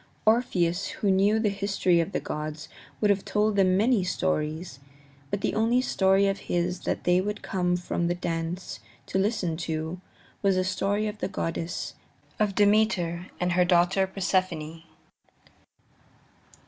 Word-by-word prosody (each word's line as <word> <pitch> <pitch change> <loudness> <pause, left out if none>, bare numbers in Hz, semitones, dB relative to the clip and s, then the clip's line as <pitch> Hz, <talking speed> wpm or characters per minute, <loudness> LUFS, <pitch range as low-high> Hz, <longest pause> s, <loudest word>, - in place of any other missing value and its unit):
Orpheus, 185 -7 +2
who 200 - 0
knew 200 +3 +3
the 220 -1 +2
histories 195 -3 +1
of 165 - -3
the - - -1
gods, 150 0 -5 0.3
would 210 -1 +3
have 195 -1 0
told 210 0 +1
them 185 -2 +4
many 220 -1 +3
stories, 160 -4 -2 0.5
but 200 - -2
the - - 0
only 230 +3 +2
story 195 -5 +3
of 195 0 -1
his 175 +1 0
that - - -2
they 180 +1 +3
would 210 +2 -4
come 180 -1 0
from 175 -1 -2
the 175 - 0
dance 165 - -4 0.3
to 190 - -1
listen 195 -5 0
to 160 +1 -4 0.4
was 195 -2 +2
a 185 - +2
story 200 +3 0
of 210 0 -4
the - - -1
goddesses, 165 -2 -3 0.5
of 210 -2 +1
Demeter 205 -5 +2
and 180 0 0
her 180 +1 +4
daughter 180 +2 +3
Persephone. 185 -4 -1
185 Hz, 150 wpm, -27 LUFS, 175-200 Hz, 0.5 s, them